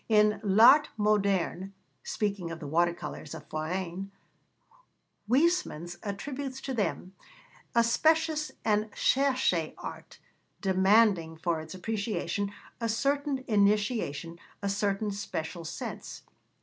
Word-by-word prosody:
In 210 -1 +4
L'Art 235 +9 +7
Moderne, 200 -3 +1 0.3
speaking 200 -5 -2
of 165 -1 -6
the - - -7
water 170 +4 +3
colours 170 - -7
of 150 -2 -10
Forain, 180 +4 -3 1.2
Huysmans 255 - +1
attributes 260 +6 -5
to 270 - -4
them 200 -4 -2 0.6
'a 235 - +6
specious 315 +5 +2
and 215 0 +2
cherché 255 - +1
art, - - -9 0.4
demanding, 190 -3 +3
for 165 -1 -1
its 160 +3 -9
appreciation, 205 0 -2 0.3
a 230 -1 -1
certain 275 +3 0
initiation, 200 - +1 0.2
a 200 - 0
certain 200 +1 0
special 175 -4 -5
sense.' 165 +1 -6
200 Hz, 110 wpm, -29 LUFS, 175-235 Hz, 1.2 s, L'Art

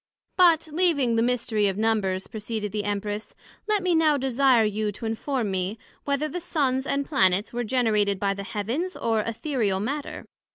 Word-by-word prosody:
But 335 -3 +5
leaving 300 -8 +2
the 225 - +2
mystery 230 -3 +1
of 195 0 -2
Numbers, 210 -4 0
proceeded 215 -1 -5
the 210 0 -3
Empress, 205 +1 -3 0.3
Let 420 -3 +1
me 365 -1 +2
now 315 -3 +4
desire 260 -2 +3
you 210 0 -1
to 225 - -8
inform 225 0 -2
me, 190 +3 -2 0.3
Whether 280 +2 0
the 330 +4 -4
Suns 275 -6 -1
and 280 0 0
Planets 195 - +2
were 240 0 -1
generated 215 -5 +1
by 200 -1 +1
the 200 - -6
Heavens, 230 - -3
or 225 -2 0
Æthereal 230 -4 -1
Matter? 280 +8 -4
230 Hz, 170 wpm, -25 LUFS, 205-280 Hz, 0.3 s, But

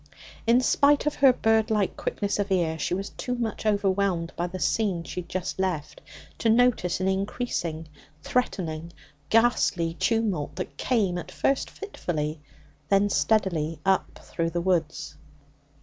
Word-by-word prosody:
In 240 +2 +5
spite 285 +3 +3
of 300 - +1
her 270 -2 +6
bird 225 -3 +2
like 210 -3 +1
quickness 205 0 -2
of 200 -1 -1
ear, 165 -4 +1
she 175 - 0
was 195 +2 -4
too 250 -1 -4
much 225 -2 -3
overwhelmed 195 -4 +1
by 175 - -1
the 185 +1 -6
scene 190 -2 0
she 180 - -5
had 170 - -16
just 185 0 -3
left 160 -6 -2 0.4
to 225 - +2
notice 225 -6 +3
an 185 - 0
increasing, 190 -5 -2 0.4
threatening, 170 -9 -2 0.4
ghastly 220 -7 +3
tumult 205 -6 0
that 185 - -5
came, 200 -8 0
at - - -9
first 275 - 0
fitfully, 155 - -4 0.5
then 200 +1 +3
steadily, 170 -9 +1
up 190 0 +1
through 165 -1 -2
the 175 +1 -2
woods. 170 -4 -1
190 Hz, 150 wpm, -26 LUFS, 170-225 Hz, 0.5 s, her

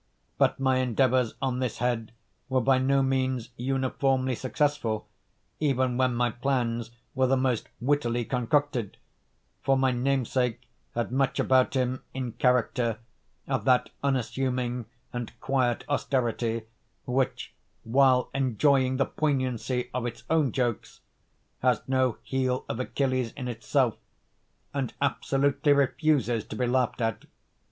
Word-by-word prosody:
But - - +3
my 130 -1 +2
endeavours 130 -1 +2
on 130 -2 0
this 125 -3 -2
head 120 -2 -1 0.4
were 130 0 +2
by 130 +1 +3
no 135 +1 +3
means 130 -2 0
uniformly 130 +1 0
successful, 130 -3 -1 0.5
even 130 -4 +1
when 130 -1 +2
my 120 0 +1
plans 120 -3 -1 0.2
were 130 0 +2
the 135 +1 +3
most 130 -3 0
wittily 120 -3 +1
concocted; 125 -2 0 0.6
for 135 0 +2
my 130 -1 +3
namesake 125 -1 0 0.3
had 120 0 -1
much 135 +1 +1
about 130 +1 +3
him, 130 0 0
in 130 -2 -3
character, 120 -1 +1 0.5
of - - -1
that 125 -1 +3
unassuming 125 -2 -1 0.3
and 120 -2 -6
quiet 130 -3 0
austerity 120 -5 0 0.4
which, 130 +1 -1 0.3
while 130 +1 +3
enjoying 130 0 +2
the 135 - +2
poignancy 130 -4 -1
of 125 -1 -1
its 115 - -7
own 155 -6 +3
jokes, 120 -3 -2 0.6
has 125 -1 +2
no 130 -2 +1
heel 130 -1 -1
of 115 - -4
Achilles 130 -2 -1
in 130 -3 -5
itself, 120 +1 0 0.8
and 135 -4 -2
absolutely 140 +1 +2
refuses 140 -5 +2
to - - -7
be 125 - 0
laughed 125 0 0
at. 115 -1 -1
130 Hz, 130 wpm, -27 LUFS, 120-135 Hz, 0.8 s, But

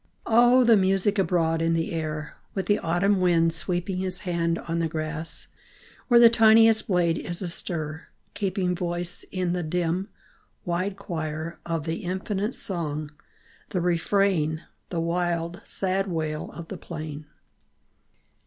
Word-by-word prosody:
O 240 +3 +6
the 235 -2 +6
music 195 +1 +2
abroad 165 -3 +1
in 165 0 +2
the 165 0 -1
air, 155 -2 -4 0.2
With 195 - -1
the 205 - +2
autumn 185 +4 +1
wind 165 -2 +3
sweeping 175 +2 -1
His 185 0 -3
hand 170 -3 0
on 170 0 -3
the 165 - +1
grass, 155 0 -4 0.6
where 240 -2 +6
The 235 - +10
tiniest 225 -1 +5
blade 175 -4 +2
is 175 0 -5
astir, 165 -3 -5 0.3
keeping 185 -3 -1
Voice 175 0 -3
in 180 -2 -1
the 180 - -1
dim, 175 +4 -1 0.6
wide 185 +3 -1
choir, 160 -4 -4
Of 165 -3 -2
the 165 0 -2
infinite 190 +4 -3
song, 155 -5 -3 0.6
the 185 - -1
refrain, 170 -2 +1 0.3
The 170 - -2
wild, 170 +1 -1
sad 195 +1 0
wail 155 -3 -3
of 170 -1 -9
the 195 - -5
plain 155 -2 -7
175 Hz, 140 wpm, -26 LUFS, 165-195 Hz, 0.6 s, The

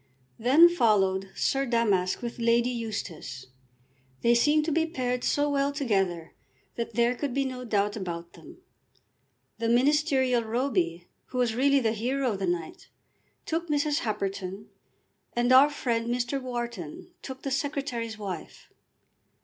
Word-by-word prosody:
Then 275 +9 +7
followed 195 - +2
Sir 270 0 0
Damask 210 -5 +1
with 235 0 -5
Lady 235 +1 +2
Eustace. 205 - -5 0.8
They 235 - +5
seemed 295 +6 +3
to 320 - -1
be 325 +2 +1
paired 250 -5 -2
so 290 0 +1
well 280 -1 +1
together 195 - -1 0.4
that 235 - -5
there 235 +1 +3
could 265 0 -4
be 275 0 +1
no 255 -1 -5
doubt 205 -2 0
about 170 -4 -6
them. 345 - -14 1.0
The 230 0 0
ministerial 260 -1 +3
Roby, 205 -8 -1 0.2
who 255 - -7
was 245 -3 +2
really 275 +4 +3
the 225 -2 +1
hero 250 +4 -1
of 200 - -4
the 190 - -1
night, 170 -2 -4 0.6
took 330 +1 -2
Mrs. 295 0 +1
Happerton, 195 -2 -4 0.6
and 240 +1 +1
our 265 +3 +8
friend 235 -5 -2
Mr. 245 +3 -1
Wharton 240 -10 -6
took 265 -1 -8
the 275 - -3
Secretary's 270 -6 -2
wife. 190 -6 -7
240 Hz, 140 wpm, -27 LUFS, 205-275 Hz, 1.0 s, our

